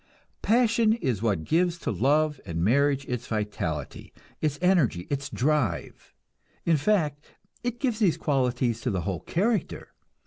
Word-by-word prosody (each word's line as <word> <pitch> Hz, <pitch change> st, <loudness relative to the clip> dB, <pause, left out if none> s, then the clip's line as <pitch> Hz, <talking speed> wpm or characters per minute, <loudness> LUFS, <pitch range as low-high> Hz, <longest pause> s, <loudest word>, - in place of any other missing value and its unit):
Passion 230 Hz, -1 st, +3 dB
is 130 Hz, -, -2 dB
what 100 Hz, -8 st, 0 dB
gives 170 Hz, -, +1 dB
to -, -, -3 dB
love 145 Hz, -, +1 dB
and 85 Hz, 0 st, -3 dB
marriage 140 Hz, +5 st, +2 dB
its 125 Hz, 0 st, -4 dB
vitality, 105 Hz, -, -4 dB, 0.3 s
its 150 Hz, -2 st, 0 dB
energy, 165 Hz, -, +2 dB
its 140 Hz, 0 st, -2 dB
drive; 125 Hz, -, -1 dB, 0.5 s
in 165 Hz, -, +4 dB
fact, 150 Hz, -4 st, 0 dB, 0.4 s
it 240 Hz, -1 st, -3 dB
gives 245 Hz, -5 st, -1 dB
these 195 Hz, -7 st, +3 dB
qualities 125 Hz, -4 st, 0 dB
to 125 Hz, -, -1 dB
the 95 Hz, -5 st, -1 dB
whole 95 Hz, -1 st, -3 dB
character. 200 Hz, -, -1 dB
140 Hz, 140 wpm, -26 LUFS, 110-175 Hz, 0.5 s, in